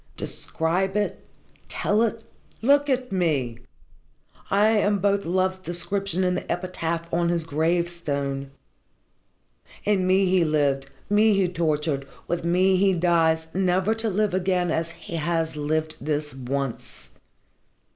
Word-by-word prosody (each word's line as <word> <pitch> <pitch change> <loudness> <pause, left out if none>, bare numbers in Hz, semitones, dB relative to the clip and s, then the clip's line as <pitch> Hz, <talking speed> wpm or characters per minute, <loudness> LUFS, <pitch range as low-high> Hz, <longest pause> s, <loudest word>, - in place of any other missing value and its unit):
Describe 185 +5 -1
it? 210 - -2 0.4
Tell 210 +2 +1
it? 230 0 0 0.4
Look 285 +3 +4
at 255 -2 0
me! 145 -11 0 0.9
I 205 +2 +4
am 205 -2 +2
both 200 +1 +1
love's 185 +2 0
description 185 +1 -1
and 180 0 +1
the - - -4
epitaph 170 -2 -2
on 170 0 +2
his 170 -1 0
gravestone. 155 -4 -1 1.4
In 200 -3 +2
me 190 +1 +4
he 185 -1 +3
lived, 140 -3 +1 0.2
me 210 +1 +4
he 195 -2 +2
tortured, 155 -5 -1 0.2
with 175 - -2
me 185 +2 +3
he 195 0 +3
dies 165 -2 +2
never 185 +2 +2
to 225 0 -2
live 205 0 0
again 180 -1 +1
as 165 +1 -1
he 165 0 -7
has 165 0 -1
lived 155 +1 -1
this 150 -1 -2
once. 135 -1 -5
175 Hz, 130 wpm, -25 LUFS, 160-195 Hz, 1.4 s, Look